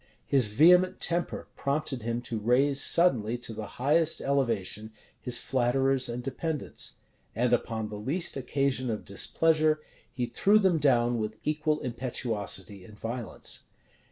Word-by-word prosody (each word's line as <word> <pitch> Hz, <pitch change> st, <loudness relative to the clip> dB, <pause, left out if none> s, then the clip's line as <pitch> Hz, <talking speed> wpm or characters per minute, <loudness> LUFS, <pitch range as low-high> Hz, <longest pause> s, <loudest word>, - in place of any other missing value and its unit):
His 130 Hz, -5 st, +4 dB
vehement 180 Hz, -, +4 dB
temper 175 Hz, 0 st, -1 dB
prompted 140 Hz, -2 st, -2 dB
him 115 Hz, +2 st, -3 dB
to 115 Hz, -2 st, -3 dB
raise 135 Hz, +6 st, +3 dB
suddenly, 120 Hz, -10 st, +3 dB
to 120 Hz, -1 st, -5 dB
the 110 Hz, -1 st, -6 dB
highest 155 Hz, +5 st, +2 dB
elevation, 115 Hz, -6 st, -1 dB, 0.3 s
his 125 Hz, -2 st, +3 dB
flatterers 130 Hz, +1 st, +1 dB
and 120 Hz, +1 st, -5 dB
dependants; 150 Hz, +3 st, -3 dB, 0.4 s
and 120 Hz, +1 st, +1 dB
upon 110 Hz, -2 st, -1 dB
the 105 Hz, -1 st, -7 dB
least 160 Hz, -, -1 dB
occasion 135 Hz, -1 st, -1 dB
of 110 Hz, -2 st, -4 dB
displeasure, 155 Hz, +9 st, +2 dB, 0.3 s
he 125 Hz, -, -2 dB
threw 205 Hz, -, +3 dB
them 190 Hz, -6 st, +2 dB
down 120 Hz, -4 st, +2 dB
with 110 Hz, 0 st, -4 dB
equal 150 Hz, 0 st, -1 dB
impetuosity 115 Hz, -6 st, -3 dB
and 105 Hz, +2 st, -14 dB
violence. 115 Hz, +1 st, -4 dB
125 Hz, 135 wpm, -28 LUFS, 115-150 Hz, 0.4 s, His